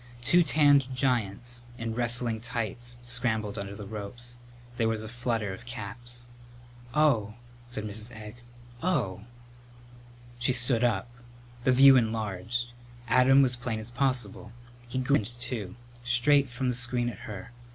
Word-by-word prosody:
Two 175 +8 +5
tanned 145 -4 +4
giants 120 -2 -1
in 115 -1 -3
wrestling 120 -1 +1
tights 120 0 -3
scrambled 115 -4 -1
under 100 0 -6
the 105 0 -8
ropes. 110 +4 -5 0.4
There 115 -1 +2
was 110 -1 -1
a - - -6
flutter 115 -3 -2
of 115 +5 -11
caps. 120 +2 -5 0.7
"Oh!" 115 -9 +3 0.3
said 120 -3 -4
Mrs. 110 +2 -3
Egg. 105 +1 -10 0.4
"Oh!" 110 - -1 1.1
She 125 +1 +2
stood 120 -1 +4
up. 115 -3 +1 0.6
The 130 - +5
view 135 +1 +8
enlarged. 110 0 -1 0.4
Adam 130 +3 +6
was 125 -2 +3
plain 120 -2 -3
as 110 +2 -7
possible. 125 -4 0 0.4
He 120 - -5
grinned, 120 -3 0
too; 115 -6 -4 0.3
straight 130 +3 +4
from 125 +1 -3
the - - 0
screen 120 0 +1
at 115 -5 -5
her. 105 +3 -8
120 Hz, 140 wpm, -28 LUFS, 110-125 Hz, 1.1 s, view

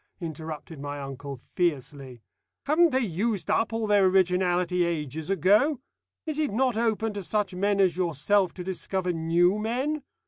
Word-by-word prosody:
interrupted 160 -2 -7
my 145 0 -5
uncle 140 0 -7 0.2
fiercely. 135 - -2 0.4
"Haven't 330 +4 +4
they 260 -2 +1
used 195 0 -1
up 225 - +1
all 225 0 -1
their 205 -2 +4
originality 180 -1 +2
ages 160 -2 -3
ago? 210 - +3 0.5
Is 310 -2 -3
it 300 -2 0
not 250 +2 +1
open 225 -1 0
to 205 - -4
such 205 0 -1
men 200 +2 0
as 185 -3 +3
yourself 180 +2 +1
to 180 - -6
discover 185 0 -2
new 170 +4 +2
men? 260 +8 -1
185 Hz, 150 wpm, -26 LUFS, 160-215 Hz, 0.5 s, Haven't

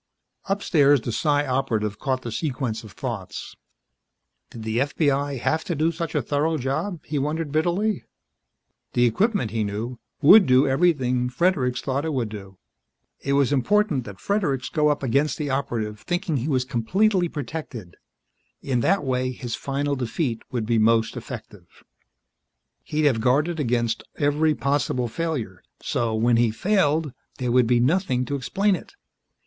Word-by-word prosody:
Upstairs, 150 - +3
the 120 - -3
Psi 145 +3 +1
Operative 115 -6 -1
caught 130 -2 -1
the 120 - -5
sequence 125 -5 -3
of 110 - -11
thoughts. - - -6 0.9
Did 115 - -9
the 110 +1 -1
FBI 140 0 0
have 160 +6 0
to 175 - -2
do 155 +3 +1
such 165 0 -5
a - - +1
thorough 155 +3 0
job, 155 +6 -3
he 150 -2 -2
wondered 150 +2 -2
bitterly. 175 +7 0 0.9
The 120 - +4
equipment, 190 - +1
he 110 -1 0
knew, 110 +4 -4 0.2
would 190 +7 +8
do 130 +2 +5
everything 130 -4 +2
Fredericks 130 -3 +1
thought 140 +1 -1
it 160 -1 -2
would 120 -5 -1
do. 95 -3 -9 0.6
It 140 - -1
was 140 0 +3
important 145 - +2
that 100 -3 -9
Fredericks 170 -11 -1
go 150 -2 +2
up 145 -1 0
against 140 +4 +1
the 145 -3 -2
Operative 115 -6 -2
thinking 175 - -2
he 130 +3 -2
was 130 -3 +1
completely 180 - +1
protected 130 - -6 0.6
in 130 -3 -1
that 195 +11 +2
way 130 -1 0
his 125 -1 -6
final 140 +1 -2
defeat 125 -1 -2
would 120 -3 -2
be 115 0 +2
most 115 +1 +3
effective. 110 -7 -10 1.0
He'd 150 0 -1
have 125 -6 +3
guarded 150 +7 +2
against 120 -4 0
every 150 +2 +2
possible 140 -3 0
failure 120 - -3 0.2
so, 115 -2 -1
when 115 +1 +3
he 120 -1 +3
failed, 155 - +1 0.2
there 125 -2 -1
would 125 -1 +4
be 120 0 +3
nothing 130 -2 +1
to 145 - -3
explain 195 +9 +1
it. 290 - -11
135 Hz, 155 wpm, -24 LUFS, 120-155 Hz, 1.0 s, would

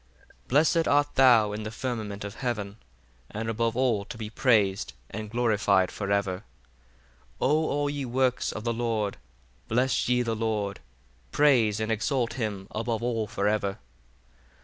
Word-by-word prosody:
34 - - -34
Blessed 160 +4 +3
art 145 0 +2
thou 120 -6 +5
in 105 +1 -4
the 110 - -4
firmament 110 -4 -4
of 100 0 -6
heaven: 110 -5 -3 0.5
and 110 +1 -4
above 115 +1 -1
all 120 -6 +2
to 115 - -9
be 110 -1 -6
praised 105 -6 +2 0.2
and 105 +1 -5
glorified 105 -5 +2
for 100 -1 -4
ever. 100 -2 +1 1.0
35 - - -28
O 155 +3 +2
all 145 0 0
ye 145 -1 -3
works 130 0 0
of 105 - -6
the 115 0 0
Lord, 115 -3 -1 0.5
bless 125 +2 +1
ye 125 0 +3
the 115 -1 -1
Lord: 105 -3 -2 0.5
praise 120 -8 +3
and 110 +1 -1
exalt 120 +2 0
him 105 -6 -4
above 115 +1 -2
all 115 -3 -1
for 105 -1 -1
ever. 100 -2 0
115 Hz, 160 wpm, -27 LUFS, 105-125 Hz, 1.0 s, thou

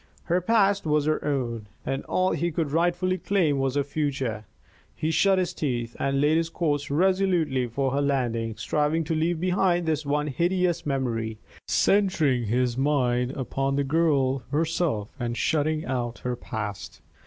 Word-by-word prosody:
Her 180 +1 +1
past 200 -2 +2
was 150 -1 +2
her 155 0 0
own, 120 -7 -2 0.2
and 135 +1 -2
all 185 0 +1
he 170 0 -1
could 155 -2 -2
rightfully 175 +3 +1
claim 165 -8 +1
was 135 0 0
her 145 - +2
future. 135 -7 -2 0.5
He 155 - -1
shut 195 +3 +3
his 185 -1 0
teeth 120 -5 -3
and 135 0 0
laid 150 +3 +3
his 165 0 0
course 145 -4 -1
resolutely 175 -5 +2
for 135 +3 -1
her 140 +2 0
landing, 120 -5 -1
striving 150 +2 0
to 160 +1 -2
leave 160 +1 0
behind 180 -1 +1
this 155 -1 0
one 150 +1 0
hideous 175 +3 0
memory, 115 -5 -2 0.3
centring 160 - +2
his 120 +3 0
mind 125 -3 +1
upon 135 +1 -2
the 140 - +1
girl 140 -3 +2
herself 155 -7 -1
and 120 -1 -2
shutting 155 0 0
out 120 -2 -2
her 125 0 0
past. 110 -4 -6
145 Hz, 160 wpm, -26 LUFS, 130-170 Hz, 0.5 s, shut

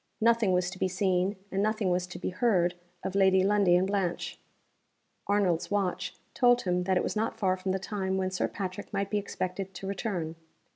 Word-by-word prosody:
Nothing 230 -3 +4
was 180 0 +1
to 185 - -9
be - - +2
seen, 185 +1 +1 0.2
and 195 - 0
nothing 215 -2 +1
was 180 0 0
to 180 - -8
be 180 - -3
heard, 180 -4 +2 0.3
of 190 - -3
Lady 190 -1 +4
Lundie 200 -3 +4
and 180 +1 +3
Blanche. 195 -3 -2 0.9
Arnold's 195 -5 +1
watch 200 -3 -1 0.2
told 245 -1 +4
him 180 -1 0
that 190 -1 +2
it - - +1
was - - -2
not 220 +2 -1
far 185 -2 +2
from 185 0 -3
the 190 - +1
time 190 -1 -2
when 185 0 -1
Sir 185 - 0
Patrick 190 0 -5
might 200 0 -2
be 210 - +2
expected 190 -1 -4
to 185 - -7
return. 185 -5 -3
190 Hz, 200 wpm, -29 LUFS, 180-205 Hz, 0.9 s, Nothing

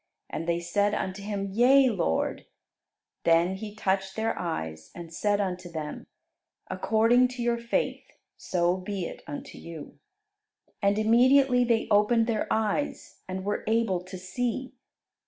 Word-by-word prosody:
And 165 - -4
they 170 0 +1
said 205 +4 +1
unto 190 +1 -3
Him, 200 -1 -3
"Yea, 260 +5 +5
Lord." 175 - -1 0.8
Then 170 +2 +4
He 210 +1 -7
touched 195 -2 -1
their 225 +1 -1
eyes, 80 - -4
and 170 -1 -9
said 205 +3 +1
unto 180 -3 -3
them, 155 -3 -6 0.6
"According 230 +3 +3
to 250 -1 -5
your 235 0 +1
faith, 235 0 -1 0.3
so 175 0 0
be 190 -1 -4
it - - -8
unto 145 - -7
you." 165 -3 -10 0.8
And 200 0 +2
immediately 250 +3 +5
they 235 -2 +1
opened 210 +3 +4
their 225 -2 -1
eyes 220 +7 -1
and 185 +1 -5
were 205 - -1
able 220 -5 +1
to 185 0 -8
see. 245 +8 -3
205 Hz, 140 wpm, -27 LUFS, 180-230 Hz, 0.8 s, Yea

